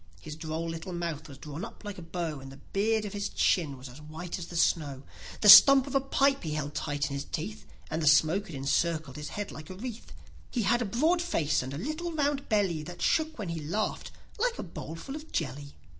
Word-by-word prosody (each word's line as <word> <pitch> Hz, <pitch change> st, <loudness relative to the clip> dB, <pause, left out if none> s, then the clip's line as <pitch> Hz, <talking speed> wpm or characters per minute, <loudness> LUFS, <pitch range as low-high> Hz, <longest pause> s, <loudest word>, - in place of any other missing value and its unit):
His 150 Hz, -, -8 dB
droll 160 Hz, +1 st, -4 dB
little 165 Hz, +3 st, -5 dB
mouth 165 Hz, -3 st, -4 dB
was 135 Hz, -, -10 dB
drawn 150 Hz, +5 st, -7 dB
up -, -, -9 dB
like 205 Hz, -2 st, -6 dB
a -, -, -8 dB
bow, 165 Hz, -3 st, -4 dB
And 135 Hz, 0 st, -10 dB
the 135 Hz, -, -12 dB
beard 215 Hz, +6 st, 0 dB
of 205 Hz, -, -6 dB
his 200 Hz, -1 st, -2 dB
chin 150 Hz, -7 st, +1 dB
was 130 Hz, +1 st, -10 dB
as 125 Hz, +4 st, -12 dB
white 160 Hz, +4 st, -6 dB
as 170 Hz, -, -6 dB
the 175 Hz, -, -9 dB
snow; 145 Hz, -5 st, +1 dB, 0.4 s
he 210 Hz, -, +2 dB
stump 265 Hz, +6 st, +11 dB
of 275 Hz, -, -7 dB
a 275 Hz, -, +3 dB
pipe 275 Hz, +1 st, +2 dB
he 155 Hz, -3 st, -3 dB
held 145 Hz, -1 st, -3 dB
tight 145 Hz, -1 st, -2 dB
in -, -, -3 dB
his 140 Hz, +1 st, -3 dB
teeth, 200 Hz, +8 st, -5 dB, 0.2 s
And 160 Hz, +1 st, -1 dB
the 155 Hz, -, 0 dB
smoke 160 Hz, +7 st, +4 dB
it 160 Hz, -, -7 dB
encircled 150 Hz, +1 st, 0 dB
his 150 Hz, -1 st, -6 dB
head 205 Hz, -1 st, -5 dB
like 155 Hz, +3 st, -10 dB
a 185 Hz, -, -7 dB
wreath; 230 Hz, +3 st, -7 dB, 0.4 s
He 235 Hz, -, -1 dB
had 240 Hz, +5 st, +2 dB
a -, -, 0 dB
broad 310 Hz, -, +2 dB
face 165 Hz, -, +1 dB
and 130 Hz, +1 st, -6 dB
a 140 Hz, -, -5 dB
little 310 Hz, -, -3 dB
round 290 Hz, -3 st, -1 dB
belly, 195 Hz, -7 st, +1 dB
That 175 Hz, +3 st, -9 dB
shook 315 Hz, -1 st, +1 dB
when 205 Hz, -6 st, -4 dB
he 165 Hz, -1 st, -3 dB
laughed, 175 Hz, +9 st, -2 dB, 0.3 s
like 485 Hz, +1 st, +1 dB
a -, -, -4 dB
bowlful 165 Hz, -, -7 dB
of 310 Hz, +1 st, -9 dB
jelly. 145 Hz, -1 st, -4 dB
170 Hz, 235 wpm, -29 LUFS, 150-220 Hz, 0.4 s, stump